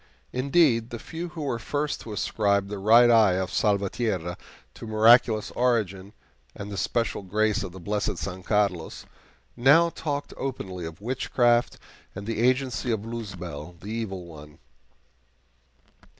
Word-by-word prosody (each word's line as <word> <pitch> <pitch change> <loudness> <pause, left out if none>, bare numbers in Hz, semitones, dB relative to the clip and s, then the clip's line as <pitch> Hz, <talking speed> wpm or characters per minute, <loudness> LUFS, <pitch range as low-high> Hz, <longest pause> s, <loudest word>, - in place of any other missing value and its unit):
Indeed, 130 -3 +2
the 120 - -6
few 165 +9 -6
who 160 -2 -7
were 125 -5 -2
first 145 +6 -2
to 115 - -9
ascribe 100 -1 0
the 105 -1 -5
right 115 +4 +6
eye 110 -5 +5
of 95 0 -2
Salvatierra 100 -3 0 0.4
to - - -10
miraculous 110 0 +4
origin 105 -5 0 0.4
and 105 0 -7
the 100 - -5
special 115 +5 -1
grace 105 +2 0
of - - -5
the 95 - -11
blessed 100 +4 -2
San 95 -1 -5
Carlos, 100 -4 -1 0.5
now 145 +8 +5
talked 145 -3 -4
openly 95 -10 -5
of 80 +3 -11
witchcraft 120 0 +1 0.4
and 100 +1 -7
the 115 0 -3
agency 130 0 +1
of 110 -1 -2
Luzbel, 90 -8 -7
the 100 +4 -8
evil 100 -6 -4
one. 75 -3 -13
110 Hz, 140 wpm, -26 LUFS, 95-120 Hz, 0.5 s, right